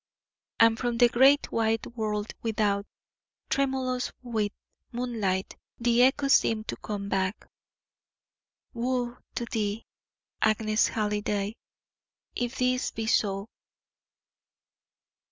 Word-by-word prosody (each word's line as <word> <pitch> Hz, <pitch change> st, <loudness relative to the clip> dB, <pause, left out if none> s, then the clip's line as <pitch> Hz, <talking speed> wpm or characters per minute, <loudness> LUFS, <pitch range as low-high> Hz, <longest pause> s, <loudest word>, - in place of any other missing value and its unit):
And 230 Hz, 0 st, +5 dB
from 240 Hz, -2 st, -1 dB
the 240 Hz, 0 st, +6 dB
great, 270 Hz, +4 st, +5 dB
wide 225 Hz, 0 st, +1 dB
world 210 Hz, -2 st, -2 dB
without, 210 Hz, -3 st, 0 dB, 0.6 s
tremulous 265 Hz, -2 st, 0 dB
with 220 Hz, -4 st, -1 dB, 0.4 s
moonlight, 220 Hz, -6 st, -2 dB, 0.2 s
the 240 Hz, 0 st, +3 dB
echo 265 Hz, +2 st, +4 dB
seemed 225 Hz, -5 st, +3 dB
to -, -, -1 dB
come 205 Hz, -2 st, -5 dB
back: 190 Hz, 0 st, -1 dB, 1.3 s
"Woe 245 Hz, 0 st, -1 dB, 0.2 s
to 240 Hz, -, -2 dB
thee, 215 Hz, -1 st, -2 dB, 0.6 s
Agnes 215 Hz, 0 st, +3 dB
Halliday, 210 Hz, -1 st, -1 dB, 0.8 s
if 245 Hz, +1 st, -3 dB
this 255 Hz, 0 st, +1 dB
be 225 Hz, -, -4 dB
so!" 200 Hz, -2 st, +1 dB
225 Hz, 100 wpm, -28 LUFS, 210-245 Hz, 1.3 s, the